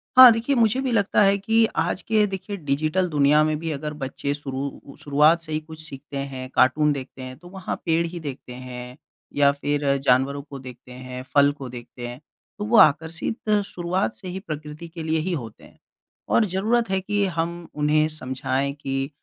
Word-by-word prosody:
हाँ, 255 Hz, -1 st, +12 dB
देखिए, 230 Hz, +5 st, 0 dB
मुझे 230 Hz, +1 st, +3 dB
भी 260 Hz, -, -1 dB
लगता 210 Hz, -3 st, +3 dB
है 200 Hz, 0 st, +5 dB
कि 225 Hz, +3 st, +3 dB
आज -, -, 0 dB
के 215 Hz, -1 st, +2 dB
देखिए 195 Hz, +1 st, -5 dB
डिजिटल 155 Hz, +4 st, 0 dB
दुनिया 150 Hz, 0 st, +4 dB
में 155 Hz, 0 st, +1 dB
भी 165 Hz, 0 st, -3 dB
अगर 150 Hz, +1 st, -4 dB
बच्चे 140 Hz, 0 st, -3 dB
शुरू 140 Hz, -2 st, -4 dB, 0.2 s
उ 140 Hz, -, -12 dB
शुरुआत 150 Hz, +3 st, +4 dB
से 160 Hz, -1 st, -10 dB
ही 155 Hz, -, 0 dB
कुछ 160 Hz, 0 st, -12 dB
सीखते 140 Hz, -2 st, -8 dB
हैं, 135 Hz, -2 st, -5 dB
कार्टून 150 Hz, +3 st, +4 dB
देखते 135 Hz, -1 st, -8 dB
हैं, 130 Hz, 0 st, -8 dB
तो 175 Hz, -, -15 dB
वहाँ 190 Hz, 0 st, -4 dB
पेड़ 165 Hz, 0 st, +2 dB
ही 175 Hz, +1 st, -7 dB
देखते 135 Hz, -5 st, -7 dB
हैं, 125 Hz, 0 st, -8 dB, 0.4 s
या 140 Hz, -1 st, +5 dB
फिर 145 Hz, +1 st, -2 dB, 0.2 s
जानवरों 135 Hz, +2 st, +2 dB
को 140 Hz, -1 st, -9 dB
देखते 125 Hz, -1 st, -12 dB
हैं, 125 Hz, 0 st, -7 dB
फल 140 Hz, 0 st, +6 dB
को 140 Hz, -3 st, -8 dB
देखते 120 Hz, 0 st, -8 dB
हैं, 120 Hz, +1 st, -8 dB, 0.4 s
तो 205 Hz, -, -2 dB
वो 225 Hz, +2 st, +3 dB
आकर्षित 160 Hz, +9 st, +3 dB, 0.2 s
शुरुआत 175 Hz, -, -2 dB
से 185 Hz, -, -11 dB
ही 180 Hz, +1 st, -4 dB
प्रकृति 155 Hz, -1 st, -7 dB
के 165 Hz, 0 st, -8 dB
लिए 160 Hz, 0 st, 0 dB
ही 180 Hz, +4 st, -2 dB
होते 120 Hz, -9 st, -6 dB
हैं। -, -, -17 dB, 0.5 s
और 230 Hz, -, +4 dB
ज़रूरत 210 Hz, +4 st, 0 dB
है 190 Hz, 0 st, +1 dB
कि 205 Hz, +1 st, 0 dB
हम 170 Hz, -1 st, -3 dB
उन्हें 150 Hz, +1 st, +3 dB
समझाएँ 135 Hz, -1 st, -2 dB
कि 135 Hz, 0 st, -2 dB
155 Hz, 195 wpm, -24 LUFS, 135-185 Hz, 0.5 s, हाँ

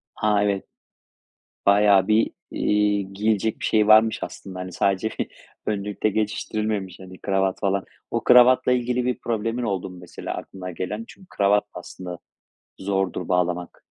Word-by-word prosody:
A, 105 Hz, -1 st, +2 dB
evet. 100 Hz, -1 st, 0 dB, 1.0 s
Bayağı 100 Hz, -1 st, +5 dB
bir, 110 Hz, +1 st, +3 dB, 0.2 s
iii, 105 Hz, -2 st, +1 dB
giyilecek 110 Hz, +1 st, 0 dB
bir -, -, -3 dB
şeyi 105 Hz, -1 st, +3 dB
varmış 110 Hz, +1 st, +6 dB
aslında. 95 Hz, -2 st, -8 dB
Hani 90 Hz, 0 st, -6 dB
sadece 100 Hz, +4 st, +1 dB
bir -, -, 0 dB, 0.4 s
önlükle 105 Hz, 0 st, -1 dB
geçiştirilmemiş 105 Hz, -2 st, -2 dB
hani 95 Hz, 0 st, -11 dB
kravat 95 Hz, -1 st, 0 dB
falan. 100 Hz, 0 st, 0 dB, 0.3 s
O -, -, -1 dB
kravatla 125 Hz, +1 st, +6 dB
ilgili 125 Hz, 0 st, +1 dB
bir 125 Hz, -1 st, -1 dB
problemin 115 Hz, +1 st, -2 dB
oldu 95 Hz, -4 st, -2 dB
mu 90 Hz, -, -11 dB
mesela 90 Hz, -, -6 dB
aklına 90 Hz, -1 st, -7 dB
gelen? 105 Hz, +6 st, -4 dB
Çünkü 190 Hz, -, -16 dB
kravat, 100 Hz, +1 st, +3 dB
aslında, 90 Hz, 0 st, -8 dB, 0.6 s
zordur 95 Hz, -2 st, -1 dB
bağlamak. 90 Hz, -1 st, -1 dB
100 Hz, 140 wpm, -24 LUFS, 95-110 Hz, 1.0 s, varmış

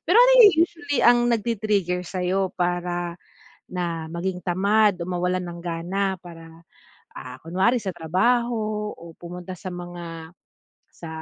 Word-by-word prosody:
Pero 360 Hz, -, +5 dB
ano -, -, +7 dB
yung, 410 Hz, -3 st, +8 dB
usually 335 Hz, -5 st, -4 dB
ang 240 Hz, +1 st, +7 dB
nag-ti-trigger 210 Hz, -5 st, 0 dB
sa'yo, 185 Hz, +1 st, -1 dB
para 175 Hz, -1 st, -1 dB, 0.5 s
na 170 Hz, -3 st, -3 dB
maging 180 Hz, +2 st, -3 dB
tamad, 200 Hz, +3 st, +3 dB
o 170 Hz, -, -4 dB
mawalan 180 Hz, 0 st, -1 dB
ng 175 Hz, -1 st, -7 dB
gana 180 Hz, +3 st, -2 dB
para, 165 Hz, -1 st, -13 dB, 0.5 s
ah, -, -, -8 dB
kunwari 190 Hz, +9 st, +2 dB
sa 195 Hz, -4 st, -4 dB
trabaho 215 Hz, +4 st, 0 dB
o 170 Hz, 0 st, -12 dB
pumunta 180 Hz, +1 st, -8 dB
sa 185 Hz, +2 st, -7 dB
mga, 175 Hz, -2 st, -8 dB, 0.6 s
sa 170 Hz, -, -10 dB
180 Hz, 135 wpm, -24 LUFS, 175-210 Hz, 0.6 s, yung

